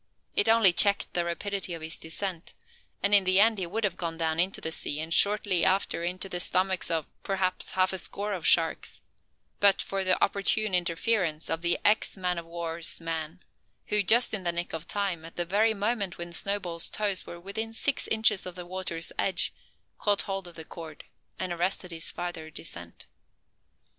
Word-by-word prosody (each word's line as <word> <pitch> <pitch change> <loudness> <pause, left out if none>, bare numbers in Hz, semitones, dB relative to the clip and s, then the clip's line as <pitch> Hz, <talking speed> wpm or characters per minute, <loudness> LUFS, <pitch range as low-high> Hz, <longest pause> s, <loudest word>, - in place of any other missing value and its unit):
It 205 - +4
only 225 -5 +6
checked 200 +2 +3
the 175 - +1
rapidity 185 +1 -3
of 165 - -9
his 160 - -2
descent; 170 +1 -4 0.5
and 200 +1 +5
in 200 -1 +8
the 185 +1 +3
end 220 0 +5
he 180 - -3
would 220 +6 -3
have 195 -4 -1
gone 165 -2 -4
down 160 -1 -1
into 185 +3 +1
the 160 - -4
sea, 150 -2 -2
and 160 +1 -3
shortly 200 -3 +4
after 190 -2 +1
into 180 +2 -2
the 180 -2 -3
stomachs 185 0 +1
of, 165 -3 -1 0.2
perhaps, 190 -2 -1
half 185 0 +1
a 190 - -1
score 205 +3 -1
of 180 -4 -2
sharks, 165 -1 +2 0.6
but 200 -1 +5
for 195 0 -2
the 185 -1 +2
opportune 200 +1 +1
interference 175 -2 0
of 165 0 -1
the 170 0 +1
ex 210 -1 +3
man 180 -2 -1
o' - - -8
war's 170 0 -4
man; 165 +1 -5 0.5
who, 210 0 +3
just 230 +5 +5
in 205 -3 -1
the 175 - +1
nick 175 +1 -4
of 160 +1 -5
time, 195 -5 -2
at 165 - -11
the 175 - -2
very 215 +5 +2
moment 205 -2 -1
when 170 0 -7
Snowball's 180 -3 0
toes 205 -3 -2
were 175 - -9
within 200 +5 -5
six 265 +4 0
inches 220 -4 +3
of 180 - -8
the 180 -1 -8
water's 175 -2 -4
edge, 190 -2 +1 0.5
caught 205 -1 +1
hold 195 -2 -4
of 175 - -12
the 160 - -9
cord 160 -3 -10 0.3
and 180 -1 -3
arrested 180 +1 -1
his 165 -1 -3
farther 175 -3 -6
descent. 85 - -8
185 Hz, 195 wpm, -27 LUFS, 170-200 Hz, 0.6 s, in